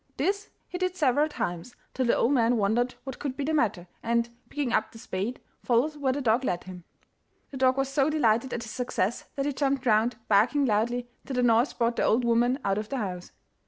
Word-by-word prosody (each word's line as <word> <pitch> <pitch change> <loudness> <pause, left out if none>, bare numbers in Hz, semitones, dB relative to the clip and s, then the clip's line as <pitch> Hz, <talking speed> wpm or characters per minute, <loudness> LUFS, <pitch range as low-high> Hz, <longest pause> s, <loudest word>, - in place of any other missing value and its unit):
This 400 +2 -1 0.2
he 360 - -6
did 365 0 -1
several 295 -1 +2
times, 175 - -4 0.2
till 255 -1 0
the - - +4
old 240 - +2
man 240 -3 +3
wondered 225 +5 +1
what 265 -2 -7
could 275 -3 -4
be 285 - -2
the 310 +3 -1
matter, 200 - 0
and, 235 0 0 0.2
picking 280 -5 -2
up 215 0 +1
the - - -13
spade, 220 +3 -4 0.2
followed 255 +6 +2
where 275 -2 +1
the 280 +2 -2
dog 240 +1 +2
led 175 -8 -1
him. 180 -2 -10 0.7
The 275 - -6
dog 260 0 +3
was 270 0 +1
so 275 +1 +2
delighted 250 -4 +2
at 235 - -3
his 220 - -8
success 240 -3 -2
that 275 - -1
he 290 - -1
jumped 275 -1 0
round, 225 +1 +3
barking 235 +8 +3
loudly, 240 +2 0 0.2
till 270 - -4
the 250 - +2
noise 235 +2 +3
brought 235 0 0
the - - +1
old 240 +2 +2
woman 240 +2 +3
out 195 +1 +1
of 215 - -6
the 275 - -2
house. 185 -6 -4
245 Hz, 225 wpm, -27 LUFS, 220-275 Hz, 0.7 s, the